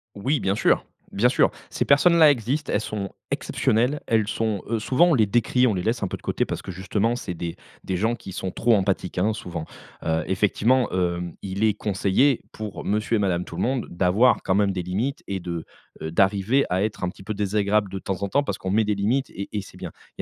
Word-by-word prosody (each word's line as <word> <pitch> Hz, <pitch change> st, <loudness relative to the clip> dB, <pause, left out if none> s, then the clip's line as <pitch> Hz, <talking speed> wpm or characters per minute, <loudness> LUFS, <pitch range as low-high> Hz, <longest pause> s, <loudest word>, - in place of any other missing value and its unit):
Oui, 135 Hz, +9 st, 0 dB
bien 95 Hz, +1 st, 0 dB
sûr, -, -, +2 dB, 0.3 s
bien 110 Hz, +5 st, +3 dB
sûr. 125 Hz, -, +3 dB, 0.2 s
Ces -, -, -1 dB
personnes-là 155 Hz, +1 st, +6 dB
existent, 135 Hz, +4 st, -2 dB
elles -, -, +2 dB
sont 105 Hz, -2 st, -4 dB, 0.2 s
exceptionnelles. 125 Hz, +7 st, +1 dB
Elles 110 Hz, -2 st, +2 dB
sont, 110 Hz, -4 st, -1 dB
heu, 115 Hz, -1 st, 0 dB
souvent 135 Hz, +10 st, +3 dB
on -, -, +4 dB
les 115 Hz, -7 st, +4 dB
décrie, 120 Hz, +4 st, +2 dB
on 110 Hz, -, +2 dB
les 90 Hz, -, -2 dB
laisse 115 Hz, +2 st, 0 dB
un -, -, +1 dB
peu -, -, -4 dB
de -, -, -12 dB
côté, -, -, -1 dB
parce -, -, -4 dB
que -, -, -7 dB
justement 105 Hz, +6 st, -1 dB
c'est 90 Hz, -, -5 dB
des 85 Hz, 0 st, -5 dB, 0.3 s
des 95 Hz, -, -2 dB
gens 110 Hz, +5 st, +1 dB
qui 95 Hz, -, -10 dB
sont 95 Hz, 0 st, -4 dB
trop 115 Hz, +4 st, +2 dB
empathiques, 95 Hz, -2 st, -1 dB
hein, 105 Hz, +4 st, +2 dB
souvent. 90 Hz, -6 st, -6 dB, 0.4 s
Heu, 80 Hz, 0 st, 0 dB
effectivement, 110 Hz, +6 st, +2 dB
hem, 90 Hz, -1 st, -1 dB
il 100 Hz, +2 st, -1 dB
est 110 Hz, -, +3 dB
conseillé 105 Hz, +6 st, +1 dB
pour, 110 Hz, -2 st, -6 dB
monsieur 110 Hz, +2 st, +1 dB
et -, -, -1 dB
madame 90 Hz, -3 st, +1 dB
Tout-le-Monde 120 Hz, +11 st, -2 dB
d'avoir 95 Hz, +8 st, +3 dB
quand 95 Hz, -, +1 dB
même 100 Hz, -1 st, +3 dB
des 90 Hz, -2 st, -3 dB
limites 105 Hz, +11 st, -2 dB
et 95 Hz, -2 st, -3 dB
de, 85 Hz, -2 st, -5 dB, 0.4 s
heu, 80 Hz, -, -4 dB
d'arriver 100 Hz, +9 st, +3 dB
à 90 Hz, +2 st, +1 dB
être 105 Hz, -3 st, -3 dB
un 90 Hz, -, +1 dB
petit 95 Hz, -, -12 dB
peu 110 Hz, -, -3 dB
désagréable 100 Hz, 0 st, +1 dB
de 95 Hz, -, -4 dB
temps 95 Hz, 0 st, -4 dB
en 100 Hz, -, -1 dB
temps 145 Hz, +6 st, +2 dB
parce -, -, -3 dB
qu'on 95 Hz, -, -4 dB
met 110 Hz, +2 st, +3 dB
des 105 Hz, 0 st, 0 dB
limites 115 Hz, +8 st, 0 dB
et 100 Hz, -, -6 dB
et 105 Hz, -, -2 dB
c'est 95 Hz, -, -14 dB
bien. -, -, -7 dB, 0.3 s
Il -, -, -3 dB
105 Hz, 230 wpm, -24 LUFS, 95-115 Hz, 0.4 s, personnes-là